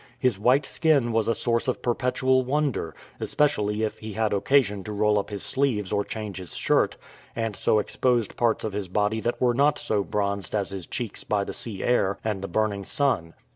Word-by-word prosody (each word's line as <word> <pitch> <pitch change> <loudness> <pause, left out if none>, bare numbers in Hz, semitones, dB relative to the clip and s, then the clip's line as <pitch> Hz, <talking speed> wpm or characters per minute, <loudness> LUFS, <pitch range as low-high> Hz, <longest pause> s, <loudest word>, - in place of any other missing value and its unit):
His 125 -7 +1
white 130 +6 +3
skin 145 -8 +2
was 115 -1 +1
a 115 - +2
source 115 0 0
of 125 - -2
perpetual 130 +1 +2
wonder, 140 - -1 0.2
especially 105 -7 +1
if 110 - -2
he 110 -1 -7
had 110 0 0
occasion 105 -2 +2
to 105 - -5
roll 105 0 +2
up 100 - -4
his 100 -2 -5
sleeves 120 -8 0
or 100 0 +1
change 105 -3 -6
his 90 - -9
shirt, - - +2 0.4
and 115 -3 -2
so 110 - +2
exposed 120 +1 +1
parts 115 -2 +1
of 110 - -3
his 100 -2 -3
body 105 +4 0
that 120 +3 -1
were 125 -1 +3
not 145 +4 +3
so 105 -2 0
bronzed 100 -1 -2
as 100 -2 -1
his 95 -3 -6
cheeks 120 -4 -4
by 105 -1 0
the - - -6
sea 105 -5 -4
air 100 -5 +2
and 105 -3 -2
the 100 - -4
burning 100 +1 0
sun. 95 - 0
110 Hz, 205 wpm, -25 LUFS, 100-125 Hz, 0.4 s, white